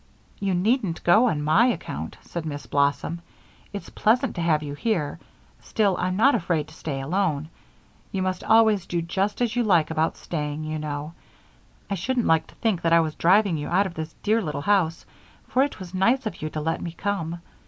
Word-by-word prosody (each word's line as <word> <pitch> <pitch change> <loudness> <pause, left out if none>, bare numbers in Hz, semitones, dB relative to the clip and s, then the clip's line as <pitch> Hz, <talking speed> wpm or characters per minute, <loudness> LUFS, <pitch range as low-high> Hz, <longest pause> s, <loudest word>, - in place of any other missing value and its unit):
"You 195 -2 0
needn't 200 -1 0
go 215 +8 +5
on 150 -9 0
my 160 +11 +4
account," 250 - -4
said 170 - -5
Miss 145 -2 -5
Blossom. 145 +4 0 0.5
"It's 200 - -7
pleasant 240 +4 +2
to 175 - -4
have 155 -2 +2
you 145 -1 -5
here 150 -2 -1 0.4
still, 205 -4 +1
I'm 185 0 0
not 260 +8 +5
afraid 165 -7 0
to - - -15
stay 150 -4 -4
alone. 155 -1 -1 0.6
You 190 -1 -1
must 185 -1 -2
always 220 -4 +4
do 170 -1 -1
just 195 +7 -1
as 235 -1 -1
you 245 - +2
like 175 -8 +3
about 160 0 0
staying, 150 -2 -4
you 155 0 -3
know; 150 +1 -5 0.7
I - - -3
shouldn't 235 +6 -1
like 160 -1 +3
to - - -18
think 215 -7 0
that 165 -1 +2
I 170 - +7
was 155 -1 -2
driving 190 +1 +3
you 145 - -4
out 190 +4 +2
of 190 - -5
this 160 -1 -6
dear 220 +2 +2
little 150 -6 -3
house, 175 -3 +1 0.4
for 255 - +2
it 285 +1 0
was 185 -1 -9
nice 230 +8 +2
of 215 - -5
you 155 - -2
to 155 - -4
let 160 +2 -1
me 170 - -5
come. 170 -3 -2
175 Hz, 205 wpm, -25 LUFS, 155-210 Hz, 0.7 s, I